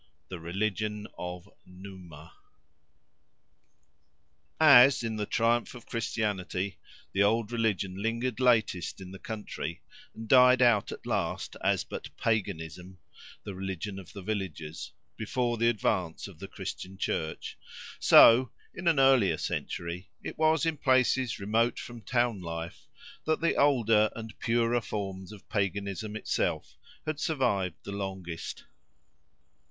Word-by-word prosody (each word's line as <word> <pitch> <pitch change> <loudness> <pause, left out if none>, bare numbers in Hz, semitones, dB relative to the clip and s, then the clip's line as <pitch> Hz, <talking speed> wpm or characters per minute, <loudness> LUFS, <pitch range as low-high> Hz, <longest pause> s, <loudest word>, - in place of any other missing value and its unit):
"THE 90 - -6
RELIGION 105 +4 -2
OF 90 +1 -6 0.2
NUMA" 90 -4 -12 2.3
As, 135 -4 +8
in 110 -1 -2
the 105 -1 -2
triumph 115 +2 +1
of 120 - -11
Christianity, 100 -4 -2 0.3
the 95 - +1
old 110 +2 +2
religion 100 -5 -1
lingered 115 +2 -1
latest 115 -9 +2
in 95 -1 -9
the 95 - -10
country, 105 -6 -6 0.3
and 110 0 -8
died 125 +1 +7
out 115 -5 +3
at - - -9
last - - -2
as - - +2
but - - -7
paganism—the 95 -1 -4
religion 95 +1 -5
of 95 - -12
the 100 - -8
villagers, 80 -7 -5 0.3
before 120 +2 -1
the 115 +1 +3
advance 95 -6 -1
of - - -14
the - - -7
Christian 95 +1 -7
Church; 80 -3 -3 0.4
so, 120 +2 +8 0.2
in 175 0 -5
an 160 -4 +4
earlier 135 -7 +5
century, 85 +2 -4
it - - -5
was 160 0 +3
in 160 -2 0
places 130 -2 +2
remote 115 +4 +1
from 120 -1 -8
town 120 -1 0
life 85 0 -6 0.4
that 155 0 +1
the 165 - +2
older 115 -7 +4
and 115 -1 -7
purer 120 +1 +1
forms 95 -3 -5
of 105 -2 -13
paganism 100 +1 -2
itself 110 - -2 0.3
had 155 -1 -3
survived 100 - 0
the 100 - -7
longest. 95 -4 -5
105 Hz, 125 wpm, -29 LUFS, 95-120 Hz, 2.3 s, As